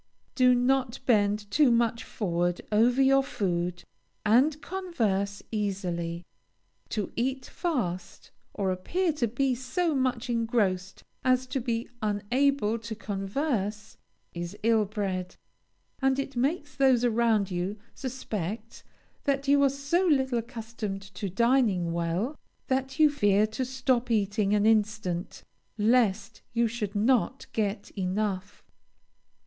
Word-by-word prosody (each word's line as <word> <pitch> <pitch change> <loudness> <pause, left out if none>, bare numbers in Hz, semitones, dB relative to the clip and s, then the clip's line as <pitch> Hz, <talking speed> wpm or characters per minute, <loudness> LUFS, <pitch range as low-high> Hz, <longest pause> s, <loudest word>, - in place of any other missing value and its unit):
Do 250 -1 +5
not 255 0 +1
bend 205 -3 +2
too 290 +3 +5
much 235 -1 +2
forward 175 -3 -1
over 235 +5 +4
your 270 +1 +5
food, 180 -8 -2 0.4
and 265 +8 +4
converse 230 - -2
easily. 180 -5 -2 0.6
To 210 -4 -2
eat 260 +2 -1
fast, 195 - -3 0.2
or 195 -2 -1
appear 330 - 0
to 260 -5 0
be 255 +4 0
so 310 +7 -1
much 255 -2 0
engrossed 220 -6 0 0.2
as 255 0 +3
to 265 +1 -3
be 235 -1 -2
unable 225 +3 +1
to 225 0 -6
converse, 210 +1 -3 0.4
is 175 +3 -5
ill 225 -1 +4
bred; 190 -3 -3 0.7
and 265 0 +3
it 275 -1 -3
makes 290 +3 -1
those 260 -3 +4
around 225 -4 +2
you 180 +4 -2 0.2
suspect 230 - -5 0.4
that 275 -1 0
you 280 0 +5
are 280 - +5
so 280 +7 0
little 265 -6 +2
accustomed 225 -4 -6
to 200 +1 -4
dining 210 -5 +2
well, 170 - -1 0.3
that 265 +1 -1
you 310 -1 +7
fear 205 -6 +3
to 220 +4 -3
stop 255 -1 0
eating 210 -1 +1
an 205 0 +2
instant, 210 -5 0 0.3
lest 215 -2 +2
you 235 0 +3
should 215 -3 -4
not 245 +4 +2
get 205 -2 -2
enough. 195 0 -2
225 Hz, 125 wpm, -28 LUFS, 200-260 Hz, 0.7 s, you